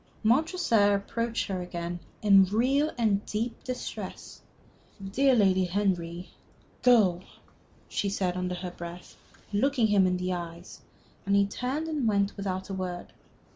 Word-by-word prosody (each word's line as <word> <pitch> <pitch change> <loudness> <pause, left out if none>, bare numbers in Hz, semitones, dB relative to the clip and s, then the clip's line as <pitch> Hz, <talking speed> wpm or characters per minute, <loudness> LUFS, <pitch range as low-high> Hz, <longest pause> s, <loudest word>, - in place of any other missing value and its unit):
Montresor 235 - +3
approached 230 +3 -2
her 190 -2 -3
again, 175 0 -5 0.2
in 195 -2 +7
real 255 +9 +2
and 210 -4 +1
deep 225 +3 -3
distress. 255 -1 -6 0.6
"Dear 250 +8 +2
Lady 190 -4 +3
Henry 180 -2 -1 0.3
" - - -32
"Go!" 210 -8 +4 0.7
she 200 - -1
said, 185 -3 -1
under 180 0 -2
her 180 0 -5
breath, 175 0 -9 0.4
looking 250 +3 +2
him 200 -3 +4
in 180 0 0
the 180 0 -2
eyes, 170 0 -7 0.4
and 200 0 +1
he 200 0 +5
turned 260 +9 -3
and 300 -7 -1
went 200 -2 +1
without 190 -2 -3
a 195 - -5
word. 180 -2 -5
200 Hz, 140 wpm, -28 LUFS, 180-230 Hz, 0.7 s, in